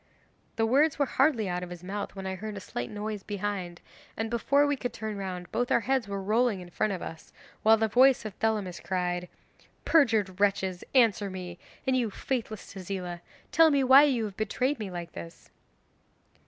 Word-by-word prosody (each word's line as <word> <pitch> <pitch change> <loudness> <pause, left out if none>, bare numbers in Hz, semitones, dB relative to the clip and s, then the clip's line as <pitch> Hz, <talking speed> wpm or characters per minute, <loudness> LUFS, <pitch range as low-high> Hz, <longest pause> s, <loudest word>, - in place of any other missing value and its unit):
The 225 - +2
words 280 +6 +3
were 285 - +2
hardly 265 -6 +2
out 180 0 -2
of 180 - -6
his 175 -1 -9
mouth 200 +3 -5
when 195 -1 -6
I 190 - -2
heard 210 +2 -6
a - - -4
slight 120 -9 -5
noise 210 0 -4
behind, 195 -4 -4 0.4
and 225 +1 -2
before 280 +5 +3
we 285 0 +1
could 245 -2 -4
turn 215 0 -5
round 185 -3 -6
both 245 +1 -1
our - - +4
heads 260 -1 0
were 200 0 -3
rolling 220 0 +2
in 175 -1 -11
front 215 +5 0
of 185 - -4
us, 160 - -9 0.3
while 220 +1 +6
the 220 0 +1
voice 255 +3 +4
of 215 - -5
Thelamis 210 -5 -1
cried: 180 -1 -2 0.6
'"Perjured 220 - +3
wretches, 195 -3 +1
answer 220 -5 +4
me; 180 -2 -7 0.3
and 260 - +2
you, 240 -3 +1
faithless 220 -1 -4
Tezila, 185 -2 -5 0.3
tell 325 0 +6
me 280 -2 +3
why 265 +2 +8
you 250 -6 +1
have 200 -3 -7
betrayed 255 +6 -1
me 210 -3 -4
like 175 -2 -6
this?" 85 -1 -10
205 Hz, 195 wpm, -28 LUFS, 185-245 Hz, 0.6 s, why